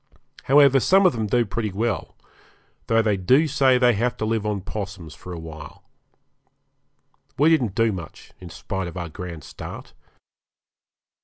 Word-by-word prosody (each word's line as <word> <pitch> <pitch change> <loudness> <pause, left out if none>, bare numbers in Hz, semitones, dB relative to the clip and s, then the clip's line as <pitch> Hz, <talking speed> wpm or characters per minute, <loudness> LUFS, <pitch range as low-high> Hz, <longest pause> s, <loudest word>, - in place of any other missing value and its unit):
However, 140 -1 +6
some 190 +8 +4
of 180 - +5
them 110 -3 -2
do 120 +3 +2
pretty 110 0 -3
well, 110 +2 -3 0.7
though 115 0 +3
they 105 -3 +1
do 130 - +3
say 135 -3 +3
they 125 -1 +4
have 120 +4 -1
to 110 - -2
live 110 -1 -1
on 105 -2 -2
'possums 95 -6 -7
for 90 - -11
a 85 - -6
time. 80 -2 -10 1.6
We 150 +4 +4
didn't 125 -11 +1
do 115 -1 +2
much, 90 -5 -9
in - - -10
spite 95 -2 -5
of 85 - -8
our 85 -2 -5
grand 85 -1 -8
start. - - -10
110 Hz, 160 wpm, -23 LUFS, 90-125 Hz, 1.6 s, However